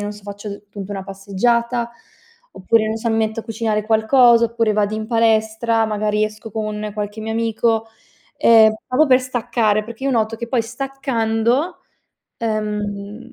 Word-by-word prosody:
non 205 0 -3
so, 210 - -13
faccio 205 0 -7
punto 200 -1 -8
una 195 -1 -5
passeggiata, 235 +5 -1 0.6
oppure, 220 +3 +1
non 220 +1 -2
so, 230 +1 -2
mi 225 - +1
metto 220 0 0
a - - -13
cucinare 220 -2 -1
qualcosa, 235 +2 +5
oppure 230 -1 0
vado 210 0 0
in 215 0 -4
palestra, 225 0 +2
magari 210 0 0
esco 215 +1 -7
con 215 0 -4
qualche 210 +1 -5
mio 220 +1 -4
amico, 225 0 0 0.5
ehm, 220 -1 +6
proprio 295 +5 +3
per 255 -1 +5
staccare. 230 -4 0
Perché 235 +3 -9
io 275 - +1
noto 225 -2 0
che 235 +1 -6
poi 245 -1 +1
staccando, 255 +1 -1 0.6
ehm 210 0 -4
220 Hz, 160 wpm, -20 LUFS, 210-235 Hz, 0.6 s, ehm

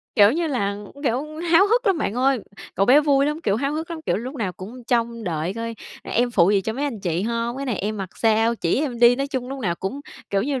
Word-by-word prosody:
Kiểu 205 +2 +6
như 335 +1 0
là, 205 -8 -1 0.3
kiểu, 255 0 0 0.3
háo 380 +4 +7
hức 475 +2 +2
lắm 385 -5 +3
bạn 215 - -1
ơi, 265 +1 +2 0.4
cậu 195 - +2
bé 275 +4 +7
vui 280 -2 +3
lắm, 300 +2 -2
kiểu, 200 +1 +1
háo 275 +3 -1
hức 320 +2 -4
lắm, 330 - -5
kiểu, - - +1
lúc 255 +7 -5
nào 205 -8 -2
cũng 230 +7 -10
trông 235 -1 -1
đợi 170 +1 -2
coi: 230 0 -4 0.3
"Em 245 +1 0
phụ 185 -5 +4
gì 200 -1 +3
cho 220 - -3
mấy 275 +5 -3
anh 240 -8 -4
chị 175 -1 -1
hông? 235 +2 -2
Cái 275 - -4
này 235 -6 -1
em 215 +2 -2
mặc 195 -2 -4
sao? 225 +1 +2
Chỉ 175 +3 0
em 260 -6 -3
đi." 240 +1 +6
Nói 275 +1 -1
chung 260 -3 -4
lúc 270 0 -6
nào 175 -6 0
cũng, 195 +11 -5 0.3
kiểu 195 0 +1
như, 270 0 -1
235 Hz, 265 wpm, -23 LUFS, 205-275 Hz, 0.4 s, háo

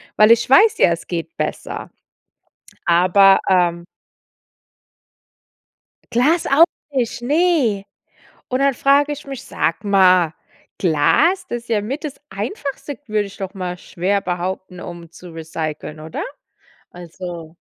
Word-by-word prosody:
Weil 215 +1 +6
ich 230 +2 +3
weiß 420 +11 +5
ja, - - +6
es 170 - -3
geht 175 - -5
besser. - - -4 0.9
Aber, 185 +3 +5
ähm 175 -2 +2 2.3
Glas 295 +9 +2
auch 290 +4 +6 0.3
nicht, 240 -2 -2
ne. 285 - +2 0.6
Und 255 +1 -1
dann 275 0 +3
frage 285 +3 +3
ich 290 0 -8
mich 270 -2 -7
Sag 185 +6 -2
mal, 185 -4 +4 0.5
Glas, 300 - +2
das 240 -1 -4
ist - - -23
ja 215 -3 +1
mit 275 +9 -5
das 290 - -6
Einfachste, 285 -6 -5
würde 210 -2 0
ich 200 - -12
doch 195 -1 -6
mal 180 -2 -5
schwer 195 +3 -2
behaupten, 180 0 -4
um 170 -2 -9
zu 175 +1 -13
recyceln, 155 -1 -6
oder? 155 +1 -6 0.7
Also 175 -1 -9
195 Hz, 130 wpm, -19 LUFS, 175-270 Hz, 2.3 s, Weil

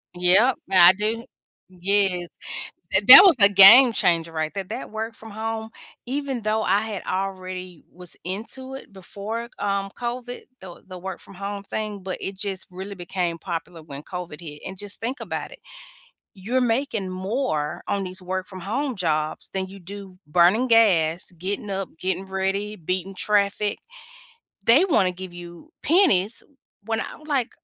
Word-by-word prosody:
Yep, 190 +8 +4 0.2
I 180 -1 +8
do 220 +4 -2 0.4
Yes. 185 -1 +1 0.6
Th - - +2
that 405 - +13
was 370 -5 +6
a 200 - +10
game 215 +6 +9
changer 165 -4 +1
right 155 -1 -3
there. 195 - -4
That 185 - -7
work 220 +1 -5
from 220 0 -11
home, 220 +1 -4 0.4
even 270 -1 -3
though 215 +1 0
I 200 +1 +2
had 215 -4 -5
already 185 -2 -5
was 180 -1 -6
into 230 +8 -5
it 270 - -11
before, 210 +5 -6
um, 200 -1 -1
COVID, 245 0 -5 0.2
the 180 -2 -12
the 185 -1 -9
work-from-home 195 +2 -7
thing, 210 0 -5
but 185 -1 -5
it 195 - -5
just 195 -2 -4
really 190 +2 -8
became 175 -1 -3
popular 165 -1 -6
when 140 -2 -9
COVID 175 -4 -8
hit. 150 -3 -10
And 190 - -7
just 205 +1 -7
think 250 +5 -4
about - - -5
it, - - -13 0.7
you're 215 +7 -2
making 230 -5 -1
more 185 - -3
on 200 -1 -1
these 185 0 -8
work 185 +1 -4
from 185 -2 -10
home 255 +7 -3
jobs 155 -4 -2
than 190 -1 -3
you 195 +1 -12
do 195 0 -10
burning 180 +10 +3
gas, 185 -9 +3
getting 200 +4 -4
up, 195 -1 -4
getting 190 +1 -2
ready, 195 +2 -2
beating 185 +1 -4
traffic. 205 +1 0 0.9
They 275 +11 +5
wanna 195 - +2
give 180 0 -9
you 175 - -12
pennies 280 - +3 0.4
when 225 0 -2
I'm 305 - -8
like, 270 -5 -1
195 Hz, 160 wpm, -23 LUFS, 180-220 Hz, 0.9 s, that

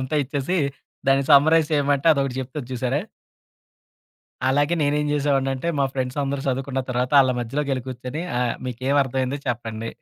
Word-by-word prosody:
అంతా 130 +4 -2
ఇచ్చేసి 145 +6 -2 0.5
దాన్ని 135 0 +4
సమ్మరైజ్ 155 +2 +6
ఏమంటే 140 +1 0
అదొకటి 135 -3 -1
చెప్తూది 130 +1 -6
చూసారా? 130 +3 -1 1.5
అలాగే 145 +5 +2
నేనేం 150 +1 +1
చేసేవాడనింటే 135 0 0
మా 140 - +3
ఫ్రెండ్స్ 130 +1 -3
అందరూ 140 0 -2
చదువుకున్న 135 +1 -1
తర్వాత 125 +2 -1
ఆళ్ళ 130 - +3
మధ్యలో 135 +5 -2
కెళ్ళికూర్చొని 130 +2 -4 0.2
ఆహ్, 120 -2 0
"మీకేమర్థమైందో 130 +1 0
చెప్పండి." 115 -1 -3
135 Hz, 130 wpm, -23 LUFS, 125-145 Hz, 1.5 s, సమ్మరైజ్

